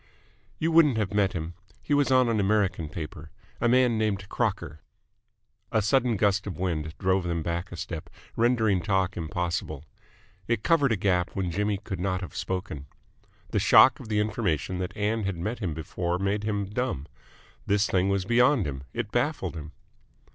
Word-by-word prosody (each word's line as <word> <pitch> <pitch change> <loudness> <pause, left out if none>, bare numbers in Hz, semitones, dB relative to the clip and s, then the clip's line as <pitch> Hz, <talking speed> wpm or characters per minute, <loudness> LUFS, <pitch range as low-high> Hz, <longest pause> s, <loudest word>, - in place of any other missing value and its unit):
"You 165 +1 0
wouldn't 155 -7 +5
have 105 -2 -1
met 100 -2 +2
him. 85 0 -4 0.3
He 145 - -2
was 145 -1 +3
on 130 -1 +4
an 115 -2 +1
American 100 -6 +1
paper. 80 -1 -7 0.3
A 120 - +2
man 125 -2 +3
named 100 -3 -1
Crocker." 75 +2 -2 0.9
A 110 - +3
sudden 120 +1 +2
gust 100 0 +1
of 90 -6 -5
wind 80 -4 -2
drove 95 -1 +1
them 85 -2 -2
back 85 +2 -3
a - - -6
step, 85 -2 -6 0.3
rendering 110 -5 +2
talk 95 0 0
impossible. 85 -3 -3 0.6
It 115 -3 0
covered 145 -6 +3
a - - +3
gap 90 -2 0
when 95 -3 -1
Jimmy 105 +3 0
could 95 -2 -6
not 95 0 -1
have 90 - -8
spoken. 75 -6 -4 0.6
The - - +1
shock 130 - +6
of 125 - -10
the 105 -1 +1
information 100 -5 -1
that 90 -1 -4
Ann 105 +2 0
had 95 -3 -2
met 105 +8 -3
him 90 -8 -3
before 85 +3 -2
made 100 +2 -1
him 105 -2 -1
dumb. 120 - -2 0.6
This 100 +1 +3
thing 95 -1 +1
was 100 -1 0
beyond 120 +1 +3
him. 65 -2 -4
It 115 -3 -3
baffled 120 - -1
him. 75 -1 -7
100 Hz, 175 wpm, -27 LUFS, 90-110 Hz, 0.9 s, shock